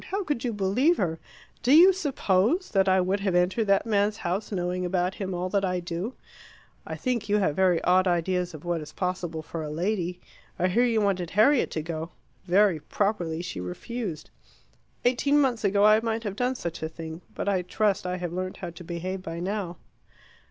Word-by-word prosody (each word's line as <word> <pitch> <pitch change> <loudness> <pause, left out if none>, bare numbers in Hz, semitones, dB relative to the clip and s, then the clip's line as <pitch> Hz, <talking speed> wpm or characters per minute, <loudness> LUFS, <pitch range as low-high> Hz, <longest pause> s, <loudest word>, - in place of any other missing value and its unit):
"How 400 +1 -1
could 295 -8 -2
you 245 - 0
believe 225 - +2
her? 165 -4 -1 0.4
Do 245 - +2
you 365 +4 +8
suppose 285 - +1
that 195 -2 +3
I 190 0 +4
would 185 +2 +1
have 195 -2 0
entered 185 +5 +2
that 195 +1 +3
man's 210 -1 +1
house, 190 +4 -3
knowing 180 -1 -2
about 180 +1 0
him 190 -2 -4
all 180 +1 -2
that 200 +1 +1
I 180 -1 0
do? 175 +7 -4 0.7
I - - -4
think 235 -5 -2
you 205 - +3
have 190 -8 +1
very 185 -2 +3
odd 185 +1 +4
ideas 180 0 0
of 155 - -11
what 175 -2 -1
is 150 - -9
possible 180 -3 -3
for 160 +1 -6
a 155 - -4
lady. 180 +2 -2 0.4
I 185 - +1
hear 235 +7 +3
you 230 -3 +2
wanted 190 -4 0
Harriet 235 - +4
to 155 - -2
go. 160 0 -4 0.4
Very 190 -2 +4
properly 175 -3 -1
she 175 - -5
refused. 160 - -5 0.7
Eighteen 280 +4 +3
months 255 -6 +1
ago 200 0 +3
I 215 +1 +7
might 225 0 -2
have 205 -3 -4
done 250 +3 0
such 170 -8 -5
a 160 - -2
thing. 160 +1 -8
But - - -4
I 195 -2 +2
trust 195 +1 0
I 180 0 -2
have 175 -2 -4
learnt 185 +1 -4
how 175 -2 -6
to 175 +1 -11
behave 180 +3 -4
by 165 -2 -6
now." 185 -1 -3
185 Hz, 200 wpm, -26 LUFS, 175-215 Hz, 0.7 s, you